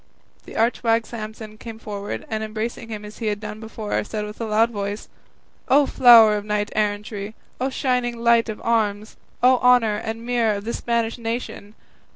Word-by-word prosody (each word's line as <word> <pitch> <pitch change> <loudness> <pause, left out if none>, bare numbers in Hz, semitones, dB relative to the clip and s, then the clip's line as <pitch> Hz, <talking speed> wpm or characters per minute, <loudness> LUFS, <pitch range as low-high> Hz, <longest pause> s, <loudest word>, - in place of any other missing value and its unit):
The - - -11
arch 230 +2 +1
wag 230 -1 +2
Samson 215 -1 -8
came 225 -2 -8
forward, 205 -2 -6
and 220 0 -3
embracing 220 +1 -5
him 210 -1 -6
as 210 - -11
he 225 - -2
had 205 -1 -1
done 210 0 -7
before, 220 -1 -3
said 210 0 -4
with 210 +2 -9
a - - -1
loud 220 +2 +3
voice, 205 -1 -4 0.6
"O 285 +2 +5
flower 230 -5 +7
of 205 - -5
knight 210 0 -2
errantry! 210 0 -2 0.2
O 260 +2 0
shining 250 -3 -1
light 235 0 +3
of 215 - -5
arms! 215 -2 0 0.3
O 255 0 +6
honour 245 -4 +4
and 225 +2 -5
mirror 235 -3 +1
of 200 - -5
the 235 - -3
Spanish 235 0 -1
nation! 225 -2 -5
220 Hz, 185 wpm, -22 LUFS, 210-235 Hz, 0.6 s, flower